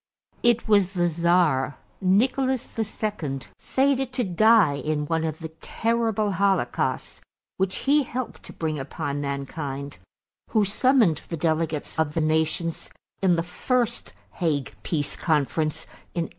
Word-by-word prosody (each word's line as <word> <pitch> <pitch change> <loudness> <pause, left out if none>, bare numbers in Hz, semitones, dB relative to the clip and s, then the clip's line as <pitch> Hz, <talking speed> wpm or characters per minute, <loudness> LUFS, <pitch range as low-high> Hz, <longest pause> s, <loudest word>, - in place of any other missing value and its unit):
It 240 -1 +3
was 200 -3 +4
the 175 -2 +1
Czar, 170 -5 +2 0.2
Nicholas 255 +7 +1
II, 210 -10 -3 0.2
fated 270 -1 +1
to 250 -1 0
die 200 -5 +4
in 150 +1 -1
one 160 +1 0
of 160 -1 -2
the 160 - -5
terrible 225 -2 0
holocausts 195 +1 0 0.4
which 190 0 0
he 290 +2 +5
helped 255 -1 -5
to - - -9
bring 155 -2 -2
upon 140 +1 -3
mankind, 140 - -4 0.5
who 215 -2 +3
summoned 220 - +3
the 165 - -3
delegates 160 -1 -1
of 150 -2 0
the 165 - +1
nations 160 +1 0 0.3
in 185 -3 +4
the 165 - 0
first 235 +7 -1 0.3
Hague 150 -7 0
Peace 145 -3 -1
Conference 155 0 0 0.3
in 170 - +1
1899. - - -7
170 Hz, 135 wpm, -25 LUFS, 155-220 Hz, 0.5 s, he